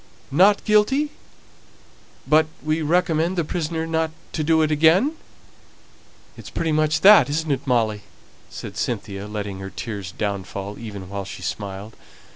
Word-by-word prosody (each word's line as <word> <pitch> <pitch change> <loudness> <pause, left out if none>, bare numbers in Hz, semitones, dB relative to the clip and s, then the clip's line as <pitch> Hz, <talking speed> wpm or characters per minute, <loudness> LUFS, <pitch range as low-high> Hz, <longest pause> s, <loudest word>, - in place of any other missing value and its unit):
"Not 195 +8 +4
guilty, 265 +8 +3 1.1
but 155 +1 +4 0.2
we 155 +1 0
recommend 170 +2 +1
the 170 - +2
prisoner 160 0 -3
not 160 0 0 0.2
to 155 - -1
do 160 +1 +3
it 155 - 0
again. 160 - +4 1.2
It's - - -10
pretty 165 -1 -2
much 155 0 +1
that, 205 -5 +8
isn't 155 +1 -1
it, 135 - -2
Molly?" 110 -4 +1 0.5
said - - -8
Cynthia, 100 -3 -3
letting 105 -2 -5
her 95 0 -6
tears 100 -4 -6
downfall, 100 0 -4
even 100 -5 -7
while 100 +1 -5
she 95 -1 -9
smiled. 100 +4 -5
150 Hz, 140 wpm, -22 LUFS, 100-165 Hz, 1.2 s, that